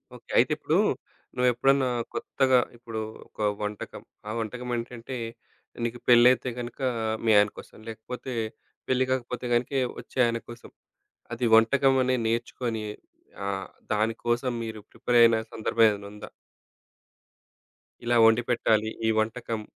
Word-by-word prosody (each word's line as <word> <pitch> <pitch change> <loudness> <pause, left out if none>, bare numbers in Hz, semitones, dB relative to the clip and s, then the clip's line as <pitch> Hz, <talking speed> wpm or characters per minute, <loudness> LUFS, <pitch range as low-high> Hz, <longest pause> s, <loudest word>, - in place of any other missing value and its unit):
Okay. - - -17
అయితే - - +4
ఇప్పుడూ, - - +1 0.6
నువ్వు 125 0 +3
ఎప్పుడన్నా 135 +2 +3 0.2
కొత్తగా 130 -2 +2 0.2
ఇప్పుడు 115 -2 -6 0.3
ఒక - - -26 0.2
వంటకం, 105 0 -5 0.3
ఆ - - -2
వంటకం 125 +3 -5
ఏంటంటే 120 +1 -6 0.7
నీకు 120 +1 -4
పెళ్లైతే 125 +1 +6
గనుక 120 0 -6 0.5
మీ 110 - +4
ఆయన 105 0 +5
కోసం, - - -12
లేకపోతే 125 +4 -7 0.6
పెళ్లి 130 0 +2
గాకపోతే 125 -1 -2
గనుక 120 +3 0 0.3
వచ్చే - - -13
ఆయన 115 0 0
కోసం, 120 0 -10 0.6
అది 120 +1 -1
వంటకం 135 +4 +4
అని 130 0 +2
నేర్చుకొని 115 -1 -2 0.6
ఆహ్, 95 -1 -3 0.2
దాని 110 +2 +1
కోసం 120 +2 +1
మీరు 110 -1 -6
ప్రిపేరైన 115 -2 +4 0.2
సందర్భం 115 +1 +2
ఏదైనా 100 -1 -5
ఉందా? 105 - -10 1.7
ఇలా 120 0 +1
వండిపెట్టాలి 115 -1 +3 0.2
ఈ - - +4
వంటకం. 110 0 -2
120 Hz, 125 wpm, -27 LUFS, 110-125 Hz, 1.7 s, పెళ్లైతే